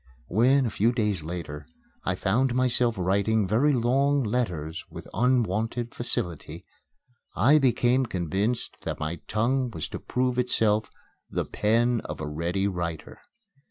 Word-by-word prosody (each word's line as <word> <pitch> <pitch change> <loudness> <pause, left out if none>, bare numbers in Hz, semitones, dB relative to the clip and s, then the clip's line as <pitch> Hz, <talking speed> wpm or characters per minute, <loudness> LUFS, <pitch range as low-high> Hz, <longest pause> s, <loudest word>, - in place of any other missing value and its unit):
When, 130 +6 +4
a 115 - -1
few 110 +4 +2
days 105 -7 0
later, 75 -3 -6 0.4
I - - 0
found 125 +1 +1
myself 125 -2 +2
writing 100 +3 +1
very 125 +10 +3
long 135 +3 +2
letters 90 -9 -2
with - - -9
unwonted 120 0 0
facility, 90 -9 -3 0.7
I 150 +4 +5
became 130 -1 +2
convinced 95 +6 -2
that - - -4
my 80 +3 -3
tongue 125 +4 +1
was 80 -9 -5
to - - -6
prove 125 0 -1
itself 110 -3 +1 0.4
"the - - -2
pen 115 +2 +1
of 75 - -6
a 80 - -3
ready 85 +6 -1
writer." 85 -4 -4
110 Hz, 135 wpm, -26 LUFS, 90-125 Hz, 0.7 s, I